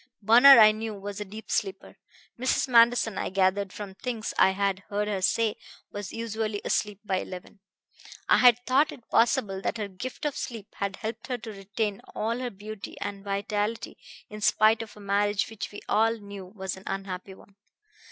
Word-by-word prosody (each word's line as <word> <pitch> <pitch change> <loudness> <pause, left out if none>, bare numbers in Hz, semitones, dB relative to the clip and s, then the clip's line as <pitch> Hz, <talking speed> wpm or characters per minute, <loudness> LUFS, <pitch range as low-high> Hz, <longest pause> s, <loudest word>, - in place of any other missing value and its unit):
Bunner, 240 +6 +8
I 215 -1 +9
knew, 220 0 -5
was 200 +1 -7
a - - -4
deep 215 +3 -10
sleeper. 195 -3 -2 0.4
Mrs. 255 +2 +1
Manderson, 235 -3 +4
I - - -2
had 190 - -6
gathered 195 0 +2
from 200 -1 -8
things 230 +1 -4
I - - +5
had 195 0 0
heard 210 +1 -1
her 200 -3 -2
say, 220 +3 +1 0.3
was 205 -2 -6
usually 220 -2 -3
asleep 210 -2 -1
by 190 -2 0
eleven; 185 +2 -8 0.7
I - - +5
had 245 -2 +7
thought 270 +4 +3
it 235 - -14
possible 225 -5 +2
that 230 - -2
her 210 -2 -3
gift 200 +10 -7
of 295 - -1
sleep 225 -4 -6
had 200 -1 -2
helped 225 +2 -6
her 250 - -2
to 225 -1 -8
retain 200 +1 -3
all 230 +3 -1
her 255 -1 -3
beauty 210 0 -9
and 200 -1 -5
vitality 205 +2 -2 0.3
in 210 0 -9
spite 215 +1 +4
of 220 -1 -10
a - - -12
marriage 205 0 0
which 220 - -6
we 205 - -9
all 225 +2 +2
knew 200 -3 -9
was 190 -1 -6
an 190 - -13
unhappy 190 0 -5
one. 195 +1 -19
210 Hz, 190 wpm, -27 LUFS, 195-225 Hz, 0.7 s, I